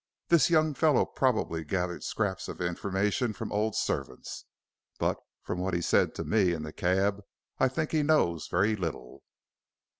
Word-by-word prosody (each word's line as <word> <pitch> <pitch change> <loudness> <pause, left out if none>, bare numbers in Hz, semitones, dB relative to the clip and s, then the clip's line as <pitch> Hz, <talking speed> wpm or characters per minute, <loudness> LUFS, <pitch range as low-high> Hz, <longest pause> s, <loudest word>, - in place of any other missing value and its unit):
This 170 -1 +5
young 155 -2 +3
fellow 150 -2 +3
probably 110 -11 0
gathered 90 +2 -2
scraps 100 -4 -2
of - - -7
information 100 +6 -1
from - - -6
old 105 +1 0
servants, - - -3 0.5
but - - 0 0.2
from 90 - -3
what 95 -1 -1
he 85 - 0
said - - +2
to - - -3
me 100 -5 +2
in 80 -2 -4
the 75 0 -7
cab, 95 +3 +1 0.4
I 130 - +5
think 155 +4 -2
he 155 - +2
knows 145 - +2
very 100 +5 +2
little." 80 -10 -5
100 Hz, 160 wpm, -29 LUFS, 90-130 Hz, 0.5 s, This